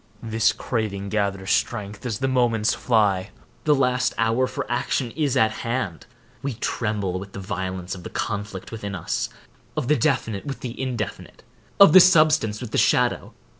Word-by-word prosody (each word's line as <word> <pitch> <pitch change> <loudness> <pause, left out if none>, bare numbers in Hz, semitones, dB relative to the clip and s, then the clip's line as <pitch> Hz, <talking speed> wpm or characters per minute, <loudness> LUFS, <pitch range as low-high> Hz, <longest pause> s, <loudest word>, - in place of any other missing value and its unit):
This 110 -1 +2
craving 105 -4 -3
gathers 100 -2 -1
strength 105 +3 -1
as 110 -3 -2
the 135 +3 -1
moments 120 -4 +2
fly. 105 -6 +1 0.4
The 150 -1 +5
last 125 -2 +1
hour 115 +3 +2
for - - -4
action 120 0 -1
is 145 -3 0
at 110 -3 +4
hand. 115 -8 -3 0.3
We 135 -3 -3
tremble 105 -5 -2
with 95 +1 -10
the - - -6
violence 95 -2 -4
of 90 - -7
the - - -8
conflict 100 -3 -4
within 105 -3 -5
us,—of 95 +6 -5
the 150 - +4
definite 130 -8 0
with 135 - -5
the 125 0 -6
indefinite—of 130 - 0
the 185 - +11
substance 155 - +4
with 125 - -6
the - - +1
shadow. - - +2
110 Hz, 160 wpm, -23 LUFS, 100-125 Hz, 0.4 s, the